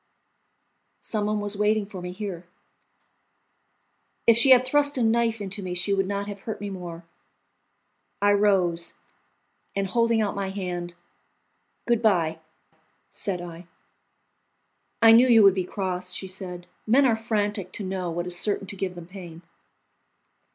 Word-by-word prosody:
"Some 210 -2 -1
one 210 0 0
was 205 0 -1
waiting 210 +1 +1
for 195 -3 -9
me 180 0 -5
here." 185 -3 -6 1.8
If 230 - +6
she 235 +4 +4
had 255 -1 +7
thrust 285 +1 +2
a 250 - +1
knife 230 0 +1
into 200 0 -5
me 180 -2 -4
she 180 +3 +1
would 195 -1 0
not 200 0 -2
have 200 -1 -7
hurt 220 - -6
me 205 -1 -5
more. 175 -3 -8 1.1
I 205 0 +3
rose, 185 -5 +2 0.8
and 195 0 0
holding 230 +3 +1
out 210 -2 0
my 195 -1 -3
hand, 175 -3 -5 0.9
"Goodbye," 195 -9 +1 0.7
said 185 -4 -3
I. 170 0 -10 1.4
"I 225 - +9
knew 235 +3 +7
you 230 -3 +6
would 195 -1 +7
be 185 -2 -2
cross," 180 -1 -3
she 190 - -5
said; 185 -2 -6 0.2
"men 265 +5 +5
are 235 -4 +3
frantic 210 -4 -2
to 210 - -5
know 185 -2 -3
what 170 +1 -3
is 180 -1 0
certain 205 -1 +1
to 195 +1 -8
give 185 -1 -4
them 175 -1 -9
pain." 175 -2 -11
195 Hz, 150 wpm, -25 LUFS, 180-215 Hz, 1.8 s, I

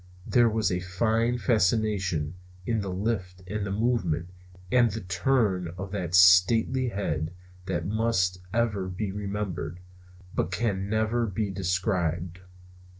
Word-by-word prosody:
There 120 -2 +4
was 110 -3 0
a 90 - 0
fine 110 +6 0
fascination 100 - +1 0.3
in 115 0 0
the 100 - -4
lift 95 -2 -3
and 105 +2 -3
the 100 - -3
movement 95 -7 0 0.4
and 120 -2 +5
the 110 +2 -5
turn 95 0 +1
of 95 +1 -6
that 90 -4 -2
stately 95 +8 +5
head 85 -5 -3 0.3
that 85 -3 -2
must 95 -3 +1
ever 105 -4 0
be 95 +2 -3
remembered, 100 -4 -4 0.5
but - - 0
can 100 -1 -1
never 110 +2 +1
be 100 0 -2
described. 90 -2 -1
100 Hz, 130 wpm, -27 LUFS, 90-110 Hz, 0.5 s, and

